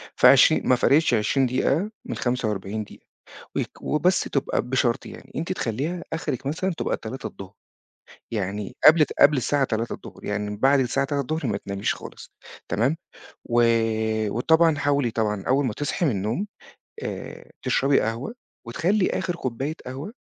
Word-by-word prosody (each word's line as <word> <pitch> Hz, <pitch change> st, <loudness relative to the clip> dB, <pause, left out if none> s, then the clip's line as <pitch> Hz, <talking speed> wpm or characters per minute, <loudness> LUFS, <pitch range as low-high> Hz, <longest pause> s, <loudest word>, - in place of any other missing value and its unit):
فعشر -, -, +6 dB
ما 130 Hz, -, +4 dB
فرقتش 145 Hz, +3 st, +3 dB
20 120 Hz, +4 st, +2 dB
دقيقة 145 Hz, -, 0 dB
من -, -, -4 dB
45 110 Hz, -4 st, -2 dB
دقيقة، -, -, -16 dB, 0.5 s
ويك -, -, -4 dB
وبس 180 Hz, +5 st, +2 dB
تُبقى 140 Hz, -, -1 dB
بشرط 125 Hz, -1 st, 0 dB
يعني، -, -, -12 dB
أنتِ 165 Hz, +4 st, -2 dB
تخلّيها 155 Hz, +5 st, -2 dB
آخرِك 140 Hz, -5 st, -3 dB
مثلًا 185 Hz, +6 st, -1 dB
تُبقى -, -, 0 dB
15:00، 105 Hz, -5 st, -8 dB, 0.8 s
يعني 100 Hz, -1 st, -3 dB
قبل 155 Hz, 0 st, +7 dB
قبل 145 Hz, 0 st, +6 dB
الساعة 140 Hz, +3 st, +1 dB
15:00، 115 Hz, -2 st, -4 dB
يعني 105 Hz, 0 st, -2 dB
من 105 Hz, -, -5 dB
بعد 135 Hz, +5 st, +4 dB
الساعة 130 Hz, +1 st, +1 dB
15:00 145 Hz, +2 st, -2 dB
ما 100 Hz, -3 st, 0 dB
تناميش 100 Hz, 0 st, -2 dB
خالص، -, -, -11 dB, 0.4 s
تمام، 125 Hz, -, +1 dB, 0.5 s
و 120 Hz, -1 st, +2 dB, 0.7 s
وطبعًا 160 Hz, +7 st, +3 dB
حاولي 140 Hz, -4 st, +1 dB
طبعًا 105 Hz, -3 st, -1 dB
أول 135 Hz, +2 st, +3 dB
ما 120 Hz, -, -1 dB
تصحي 145 Hz, +8 st, -2 dB
من -, -, +3 dB
النوم، 110 Hz, -, -2 dB, 0.6 s
آآ، -, -, -7 dB
تشربي 135 Hz, +1 st, +3 dB
قهوة، 115 Hz, -, -3 dB, 0.3 s
وتخلّي 180 Hz, -, +1 dB
آخر 180 Hz, -2 st, -2 dB
كوباية 135 Hz, +1 st, -3 dB
قهوة 135 Hz, -, -6 dB
130 Hz, 145 wpm, -24 LUFS, 110-150 Hz, 0.8 s, قبل